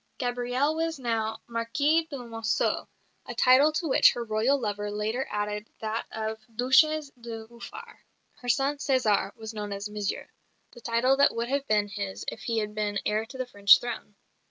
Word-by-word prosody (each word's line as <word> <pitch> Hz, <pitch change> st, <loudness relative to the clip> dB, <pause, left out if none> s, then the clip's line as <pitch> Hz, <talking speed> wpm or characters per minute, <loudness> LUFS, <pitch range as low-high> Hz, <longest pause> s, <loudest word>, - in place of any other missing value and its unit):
Gabrielle 245 Hz, +3 st, 0 dB
was 325 Hz, 0 st, -1 dB
now 225 Hz, -3 st, -2 dB
Marquise 285 Hz, +8 st, +1 dB
de 285 Hz, -, -5 dB
Monceaux, 225 Hz, -3 st, -1 dB, 0.4 s
a -, -, -6 dB
title 265 Hz, +4 st, +6 dB
to 320 Hz, +2 st, -2 dB
which 265 Hz, -, +6 dB
her 240 Hz, -, -4 dB
Royal 230 Hz, +5 st, +1 dB
lover 205 Hz, -3 st, -3 dB
later 215 Hz, +5 st, -2 dB
added 210 Hz, 0 st, -3 dB
that 220 Hz, +1 st, -3 dB
of 220 Hz, 0 st, -4 dB, 0.2 s
Duchesse 280 Hz, +5 st, +4 dB
de 230 Hz, -3 st, -8 dB
Beaufort. 235 Hz, +1 st, -11 dB, 0.4 s
Her 245 Hz, -, -7 dB
son, 275 Hz, +5 st, +2 dB
César, 225 Hz, -8 st, +1 dB
was 220 Hz, 0 st, -8 dB
known 210 Hz, -1 st, -5 dB
as 200 Hz, +1 st, -4 dB
"Monsieur," 210 Hz, -1 st, -3 dB, 0.4 s
the 240 Hz, -, -14 dB
title 235 Hz, +4 st, +2 dB
that 280 Hz, -, +4 dB
would 235 Hz, +1 st, -2 dB
have 280 Hz, +1 st, -1 dB
been 210 Hz, -1 st, +2 dB
his 200 Hz, -1 st, -5 dB
if -, -, -9 dB
he 230 Hz, -1 st, -1 dB
had 210 Hz, -1 st, -1 dB
been 210 Hz, -1 st, -1 dB
heir 215 Hz, +1 st, 0 dB
to 260 Hz, -, -10 dB
the 255 Hz, -, -2 dB
French 200 Hz, -4 st, +6 dB
throne. 235 Hz, -3 st, -6 dB
230 Hz, 180 wpm, -27 LUFS, 210-260 Hz, 0.4 s, title